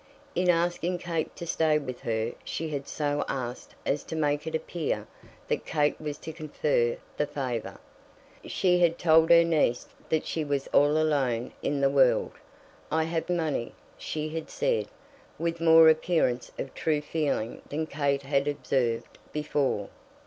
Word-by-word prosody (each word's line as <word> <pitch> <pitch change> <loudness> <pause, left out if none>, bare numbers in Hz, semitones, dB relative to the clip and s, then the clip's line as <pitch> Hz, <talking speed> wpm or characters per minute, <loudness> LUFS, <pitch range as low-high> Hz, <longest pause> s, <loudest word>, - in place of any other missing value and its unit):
In 180 +1 +1
asking 175 +1 +1
Kate 170 -2 -3
to 170 - -6
stay 160 -2 +2
with 130 -4 -5
her 115 0 -1
she 160 0 -4
had 140 -2 -4
so 145 -1 -1
asked 125 -2 -5
as 140 - 0
to - - -5
make 145 -1 0
it 160 - -2
appear 160 0 -2 0.4
that - - -1
Kate 150 -1 0
was 150 -1 -4
to 160 - -8
confer 150 -6 0 0.2
the 150 - +1
favour. 125 -6 -4 0.7
She 180 -1 +2
had 170 -1 +3
told 160 -1 +5
her 170 0 +8
niece 155 -7 +1 0.2
that 160 -1 +1
she 160 - -2
was 140 -2 -1
all 145 +2 +4
alone 135 -6 +1
in 140 -1 -1
the 135 - +4
world. 135 -3 +4 0.6
"I 160 +1 +2
have 165 +1 -2
money," 160 -8 -1 0.2
she 155 0 -4
had 160 0 -5
said, - - 0 0.5
with 165 0 -2
more 165 -1 +8
appearance 160 -6 +2
of 135 - -5
true 150 -2 0
feeling 145 -7 -2
than 155 +2 -2
Kate 140 -2 -1
had 140 0 +1
observed 130 -5 -1
before. 145 -8 -1
150 Hz, 155 wpm, -28 LUFS, 140-160 Hz, 0.7 s, her